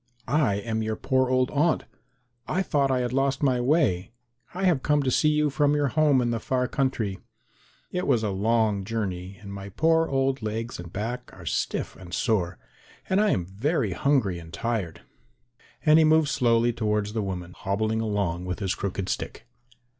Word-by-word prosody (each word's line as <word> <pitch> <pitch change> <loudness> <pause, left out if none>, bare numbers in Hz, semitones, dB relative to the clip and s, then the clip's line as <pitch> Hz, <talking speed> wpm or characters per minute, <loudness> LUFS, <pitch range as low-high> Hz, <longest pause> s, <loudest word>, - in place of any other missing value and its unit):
I 135 -6 +2
am 110 +2 -2
your 110 0 -1
poor 130 +1 +1
old 130 0 +2
aunt. 155 +3 +2 0.6
I 190 - 0
thought 140 -6 +1
I 130 -1 +1
had 125 0 -2
lost 135 +1 +1
my 130 -3 +2
way. 125 - +2 0.4
I 185 +2 -5
have 175 -8 +3
come 150 0 +2
to 130 - +1
see 150 - +3
you 150 -1 +2
from 145 +1 +2
your 145 -2 +1
home 145 -3 +3
in 120 - 0
the 115 - -1
far 125 +2 0
country. 120 -9 -1 0.7
It 180 0 -2
was 115 -2 +2
a 105 - 0
long 105 0 +1
journey 95 -3 -4
and 100 -1 -8
my 100 0 -7
poor 160 - +2
old 135 -1 0
legs 110 +1 -4
and 85 -1 -8
back 115 +6 -4
are - - -12
stiff - - -2
and 90 -1 -7
sore, 95 -7 0 0.5
and 190 +2 +4
I 215 - +3
am 90 - 0
very 110 - -1
hungry 105 -7 +1
and 80 -1 -12
tired;" 110 -8 -3 0.8
and 155 +1 +7
he - - +6
moved 155 -1 +4
slowly 120 -3 +2
towards 105 -2 -1
the 110 - -1
woman, 90 -3 -5
hobbling 110 +3 -1
along 100 -5 -1
with 90 0 -3
his 95 -3 -1
crooked 95 -1 -3
stick. - - -4
115 Hz, 185 wpm, -26 LUFS, 100-140 Hz, 0.8 s, and